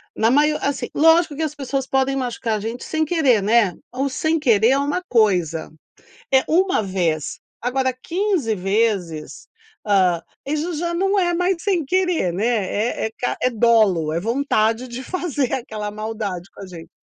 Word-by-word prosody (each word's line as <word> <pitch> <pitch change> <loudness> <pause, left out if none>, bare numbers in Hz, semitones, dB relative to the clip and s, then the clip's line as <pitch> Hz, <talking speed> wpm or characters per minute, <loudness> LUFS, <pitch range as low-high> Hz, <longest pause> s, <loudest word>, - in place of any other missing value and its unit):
na 225 +1 +2
mai 295 +3 +4
assim 280 -1 -2
lógico 325 0 +4
que 320 - -5
as 300 -1 -3
pessoas 270 -1 -3
podem 270 0 +1
machucar 240 -4 -2
a - - -5
gente 230 +3 -5
sem 315 0 -1
querer, 285 - +2
né. 210 -3 +3 0.2
O 270 +2 -1
sem 315 +4 0
querer 230 -4 +4
é 270 - +3
uma 290 +6 -1
coisa, 180 -10 +1 0.6
é 265 - +5
uma 365 - +2
vez, 170 -6 -2 0.2
agora 260 +2 0
quinze 335 - -1
vezes, 195 -5 -1 0.4
ah, 185 -5 +2 0.2
isso 305 +5 -2
já 340 +2 -2
não 390 +3 +1
é 350 -1 +1
mais 360 0 0
sem 370 -6 +1
querer, 360 - +1
né? 200 +5 -1 0.6
É - - -7 0.3
é 255 - +3
dolo, 215 -9 +3
é 165 - 0
vontade 230 +1 0
de 245 +1 -7
fazer 300 -6 -2
aquela 215 -4 -4
maldade 210 -4 -5
com - - -12
a - - -9
gente. 170 -3 -11
250 Hz, 165 wpm, -21 LUFS, 210-305 Hz, 0.6 s, é